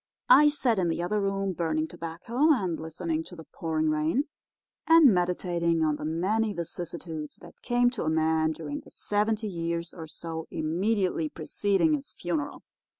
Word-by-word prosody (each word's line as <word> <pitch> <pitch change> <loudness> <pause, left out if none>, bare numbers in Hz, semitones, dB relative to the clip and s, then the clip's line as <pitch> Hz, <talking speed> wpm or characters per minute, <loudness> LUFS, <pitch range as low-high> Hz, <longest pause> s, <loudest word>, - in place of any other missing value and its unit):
I 300 -12 +8
sat 255 -7 +1
in 180 - +1
the 165 +1 -1
other 210 +4 0
room 195 -1 -1
burning 160 -2 -1
tobacco 225 - 0
and 185 - +1
listening 160 0 -3
to - - -11
the 165 - -10
pouring 155 -1 -1
rain 155 - +1 0.6
and 325 -7 +8
meditating 175 -2 +1
on 155 -1 +1
the 150 - -6
many 205 +7 0
vicissitudes 170 -2 -5
that - - -14
came 245 0 +2
to 245 - -4
a - - +1
man 160 0 +2
during 150 -2 -5
the - - -15
seventy 215 +1 -1
years 170 -2 -3
or 165 -3 -8
so 160 +1 -6
immediately 175 +1 0
preceding 200 - +1
his 285 -2 -3
funeral. 165 -5 -3
170 Hz, 160 wpm, -28 LUFS, 160-210 Hz, 0.6 s, I